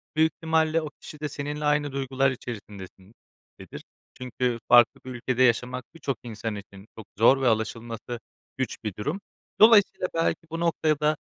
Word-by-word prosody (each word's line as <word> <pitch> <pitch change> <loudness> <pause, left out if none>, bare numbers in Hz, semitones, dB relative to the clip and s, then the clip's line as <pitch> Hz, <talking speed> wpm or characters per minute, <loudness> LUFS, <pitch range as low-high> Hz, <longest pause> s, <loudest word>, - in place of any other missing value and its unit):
Büyük 160 +1 +4
ihtimalle 160 0 +1
o 155 - -5
kişi 150 - -10
de 150 - -3
seninle 150 +1 -4
aynı 145 -1 +1
duygular 135 0 0
içerisindedir. 105 -4 -11 0.3
Çünkü 125 -1 -2
farklı 120 -2 +6
bir 130 - -7
ülkede 125 +1 0
yaşamak 125 +1 +1
birçok 135 -5 -3
insan 110 -1 -5
için 100 0 -11
çok 110 - -9
zor 130 +5 +5
ve 130 - +2
alışılması 115 +1 -2 0.4
güç 130 - -2
bir 105 - -3
durum. 150 - -3 0.4
Dolayısıyla 210 -4 +6
belki 165 0 +1
bu 165 - -4
noktaya 160 -3 +1
da, 150 0 +2
130 Hz, 155 wpm, -26 LUFS, 115-150 Hz, 0.4 s, farklı